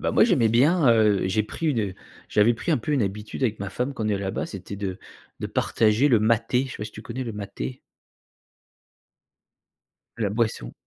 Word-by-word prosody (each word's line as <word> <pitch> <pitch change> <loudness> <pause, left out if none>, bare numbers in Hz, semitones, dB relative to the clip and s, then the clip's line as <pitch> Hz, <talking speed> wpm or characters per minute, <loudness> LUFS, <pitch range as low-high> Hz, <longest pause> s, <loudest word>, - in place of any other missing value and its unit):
Bah - - 0
moi, - - +5
j'aimais 135 - +3
bien, 140 +6 +4
heu, 105 -4 +3
j'ai 105 +3 +1
pris 160 +9 -5
une 110 -10 0 0.3
j'avais 110 +3 +4
pris 165 - -2
un 150 - +2
peu 150 +6 -3
une 135 -6 +2
habitude 105 +5 -4
avec 110 -5 0
ma 100 - -3
femme 125 +8 -2
quand 115 - -4
on - - 0
est 105 - +1
là-bas, 95 -1 -3
c'était 100 +1 -8
de 95 -2 -4 0.4
de - - -3
partager 110 +5 +2
le 120 -5 +5
maté. 115 +4 +2
Je 130 - -8
sais - - -7
pas 105 - -4
si 105 - -12
tu 110 - -10
connais 125 +3 -5
le 115 - -4
maté? 100 - -6 2.4
La 110 -3 0
boisson. 110 - -1
110 Hz, 205 wpm, -25 LUFS, 105-125 Hz, 2.4 s, moi